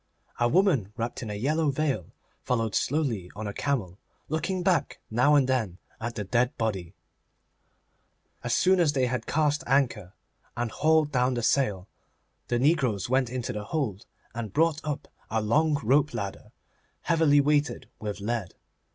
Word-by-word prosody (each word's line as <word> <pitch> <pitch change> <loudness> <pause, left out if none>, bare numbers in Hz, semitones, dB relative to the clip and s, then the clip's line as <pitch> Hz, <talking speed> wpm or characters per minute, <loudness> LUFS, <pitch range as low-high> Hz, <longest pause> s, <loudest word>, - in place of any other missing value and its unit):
A 120 0 +3
woman 150 - +2
wrapped 120 0 -3
in 115 - -5
a 105 - -3
yellow 150 +8 +1
veil 135 - -1 0.3
followed 115 -4 -1
slowly 125 - 0
on 110 +1 -5
a 100 - -4
camel, 105 -11 -2 0.3
looking 170 +4 -1
back 180 -1 +1
now 125 +6 +4
and 140 -3 +4
then 110 -9 0 0.2
at 120 +1 -4
the 105 - -3
dead 120 +5 0
body. 95 -7 -2 1.5
As - - -2
soon 185 0 +4
as 160 -4 +3
they 130 -3 +2
had 125 -2 -3
cast 150 -1 +1
anchor 120 -8 +1 0.4
and 120 -1 -1
hauled 155 -1 +2
down 125 -1 +2
the 120 - -2
sail, 105 -8 +1 0.6
the 120 - +1
negroes 125 - +1
went 130 -2 +2
into 125 -1 -3
the 105 0 -5
hold 110 - -3 0.3
and 115 -3 -5
brought 160 -1 +2
up 150 -1 -4 0.2
a 110 - 0
long 150 +9 +2
rope 140 +6 +3
ladder, 100 -1 -5 0.5
heavily 160 -3 +4
weighted 145 +1 +1
with 105 -1 -4
lead. 110 -3 -3
125 Hz, 160 wpm, -27 LUFS, 110-150 Hz, 1.5 s, now